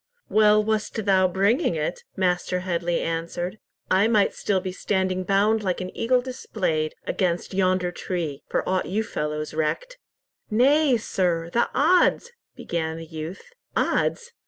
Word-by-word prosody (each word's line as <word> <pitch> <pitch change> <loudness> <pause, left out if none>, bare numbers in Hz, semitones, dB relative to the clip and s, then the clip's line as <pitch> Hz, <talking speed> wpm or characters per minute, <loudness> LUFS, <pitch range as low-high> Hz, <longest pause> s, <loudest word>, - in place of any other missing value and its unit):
"Well 215 0 +5
wast 215 0 -2
thou 190 -2 +4
bringing 195 +1 +1
it," 155 +2 -2
Master 180 -1 0
Headley 175 -1 -1
answered. 170 +4 -3 0.3
"I 195 +3 +4
might 215 -3 +3
be - - -22
still 190 -3 0
standing 185 -1 -1
bound 205 +3 +2
like 185 -3 -1
an 185 0 -6
eagle 250 +2 +2
displayed, 185 -11 -2
against 180 -2 -1
yonder 185 -1 +1
tree, 165 -6 -4
for - - -1
aught 185 0 0
you 210 +4 0
fellows 150 -5 -3
recked." - - -2 0.5
"Nay, 265 +4 +4
sir, 170 -5 -1
the 235 - +2
odds—" 360 - +3 0.2
began 160 -1 -3
the 165 - -7
youth. 160 - -8 0.3
"Odds! 475 0 0
185 Hz, 140 wpm, -24 LUFS, 170-220 Hz, 0.5 s, Well